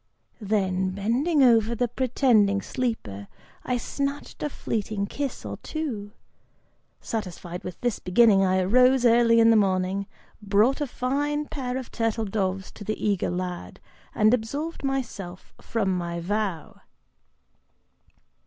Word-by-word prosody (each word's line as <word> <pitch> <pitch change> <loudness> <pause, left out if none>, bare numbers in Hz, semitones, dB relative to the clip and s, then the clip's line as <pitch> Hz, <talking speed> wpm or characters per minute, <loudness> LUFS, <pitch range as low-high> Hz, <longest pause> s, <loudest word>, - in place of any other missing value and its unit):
Then, 190 -3 0
bending 265 - +2
over 230 -2 +4
the 245 +2 +1
pretending 235 -5 +2
sleeper, 110 - -3 0.4
I 250 - 0
snatched 280 +4 -4
a 300 - -1
fleeting 215 -6 -3
kiss 275 +5 -4
or - - -5
two. 230 -10 -5 0.9
Satisfied 180 -5 -5
with 180 - -7
this 240 -4 -1
beginning, 195 +1 +4
I 185 0 +2
arose 250 +6 +4
early 230 0 +5
in 230 0 +6
the - - +5
morning, 195 -1 +1 0.3
brought 210 +8 +2
a 290 - 0
fine 290 +4 -1
pair 260 -4 -4
of 260 -2 -7
turtle 225 -1 -1
doves 190 -2 -2
to 210 - -10
the 215 +1 -3
eager 200 -3 0
lad, 180 0 -5 0.4
and 215 +1 +4
absolved 285 +9 -2
myself 230 -10 -4
from 195 -5 -1
my 170 -1 -3
vow." 190 -2 -3
220 Hz, 130 wpm, -25 LUFS, 190-250 Hz, 0.9 s, in